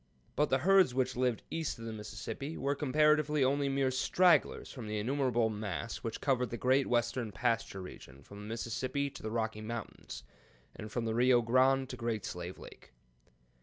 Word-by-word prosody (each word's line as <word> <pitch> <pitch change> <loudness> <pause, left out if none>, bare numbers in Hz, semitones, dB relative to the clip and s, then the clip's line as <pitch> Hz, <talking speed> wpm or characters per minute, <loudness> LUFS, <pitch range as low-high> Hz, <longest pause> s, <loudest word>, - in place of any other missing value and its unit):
But 150 0 +2
the 135 - +3
herds 185 -2 +4
which 130 -1 0
lived 125 -2 0
east 165 -4 -2
of 115 - -8
the 115 - -5
Mississippi 110 +8 -6
were 140 +1 0
comparatively 150 +1 +3
only 140 +1 +2
mere 135 -1 +1
stragglers 175 +7 +3
from 120 -5 -8
the 105 0 -2
innumerable 120 -1 +1
mass 105 +1 -4
which 115 - -5
covered 125 -3 +1
the 120 - -4
great 130 +3 +2
western 120 -1 0
pasture 100 -2 -1
region 70 -6 -12
from 100 +7 -12
the 105 - -8
Mississippi 125 +5 -2
to - - -11
the 110 - -4
Rocky 110 -1 -2
Mountains, 115 - -7 0.5
and 105 0 -8
from 120 +1 -2
the 110 - -1
Rio 120 +1 +4
Grande 130 +3 +3
to 125 - -6
Great 115 -3 -2
Slave 90 +1 -6
Lake. - - -14
125 Hz, 180 wpm, -32 LUFS, 110-135 Hz, 0.5 s, herds